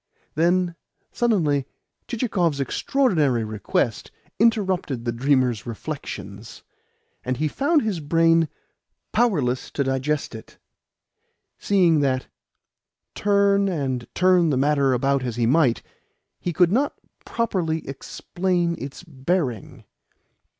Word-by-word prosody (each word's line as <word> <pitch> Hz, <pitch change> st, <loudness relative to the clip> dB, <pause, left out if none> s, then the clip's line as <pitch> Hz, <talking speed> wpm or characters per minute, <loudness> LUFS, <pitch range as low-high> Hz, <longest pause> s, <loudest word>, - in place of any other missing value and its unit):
Then 175 Hz, +2 st, +2 dB, 0.4 s
suddenly 155 Hz, -, +1 dB, 0.4 s
Chichikov's 185 Hz, -, 0 dB
extraordinary 150 Hz, -, +1 dB
request 110 Hz, +1 st, -2 dB, 0.3 s
interrupted 190 Hz, -, +1 dB
the 120 Hz, -, 0 dB
dreamer's 125 Hz, -2 st, +1 dB
reflections, 110 Hz, -5 st, -7 dB, 0.6 s
and 130 Hz, 0 st, -2 dB
he 155 Hz, +3 st, 0 dB
found 290 Hz, -, +1 dB
his 210 Hz, -6 st, -1 dB
brain 165 Hz, +1 st, +3 dB, 0.6 s
powerless 145 Hz, -, +1 dB
to 140 Hz, -, -1 dB
digest 135 Hz, +2 st, -1 dB
it, 110 Hz, -, -11 dB, 1.0 s
seeing 180 Hz, -6 st, +3 dB
that, 130 Hz, -2 st, 0 dB, 0.9 s
turn 200 Hz, -1 st, +2 dB
and 135 Hz, -9 st, -2 dB
turn 180 Hz, -2 st, +4 dB
the 140 Hz, -, +1 dB
matter 140 Hz, -1 st, +2 dB
about 135 Hz, +2 st, +1 dB
as 125 Hz, -3 st, -3 dB
he 120 Hz, -1 st, +1 dB
might, 130 Hz, -1 st, +3 dB, 0.6 s
he 175 Hz, -, -2 dB
could 175 Hz, +1 st, +3 dB
not 275 Hz, +7 st, +1 dB, 0.3 s
properly 175 Hz, -9 st, -2 dB
explain 175 Hz, +5 st, -2 dB
its 140 Hz, +5 st, -8 dB
bearing. 140 Hz, -, -3 dB
155 Hz, 105 wpm, -23 LUFS, 130-185 Hz, 1.0 s, turn